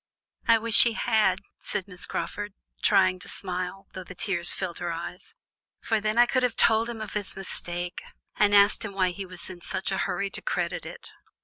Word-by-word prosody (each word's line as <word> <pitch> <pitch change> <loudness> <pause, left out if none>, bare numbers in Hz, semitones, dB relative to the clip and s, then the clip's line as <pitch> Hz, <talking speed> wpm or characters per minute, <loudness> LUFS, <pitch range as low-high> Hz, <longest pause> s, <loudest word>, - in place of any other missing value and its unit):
"I 230 - +7
wish 230 0 +6
he 235 - +1
had," 215 -5 +2 0.2
said 195 - -1
Miss 180 -2 -4
Crawford, 205 -1 -4 0.3
trying 185 -1 +4
to 190 - -9
smile, 185 0 -3
though 185 - -6
the 185 0 -11
tears 175 -2 +1
filled 185 -3 -4
her 175 -1 -2
eyes, 170 +2 -7 0.4
"for 225 -2 0
then 215 +1 -1
I 240 - +8
could 255 +1 +1
have 250 -2 0
told 225 +1 +4
him 230 -2 -6
of 215 - -6
his 205 -2 -2
mistake, 175 -2 -5 0.3
and 205 -1 +4
asked 200 +1 +5
him 205 -2 -5
why 185 -2 +1
he 195 +1 -7
was 180 -1 -8
in 180 -2 -9
such 190 +2 -2
a 190 - 0
hurry 195 +2 -1
to - - -7
credit - - -2
it." - - -10
195 Hz, 205 wpm, -27 LUFS, 180-215 Hz, 0.4 s, I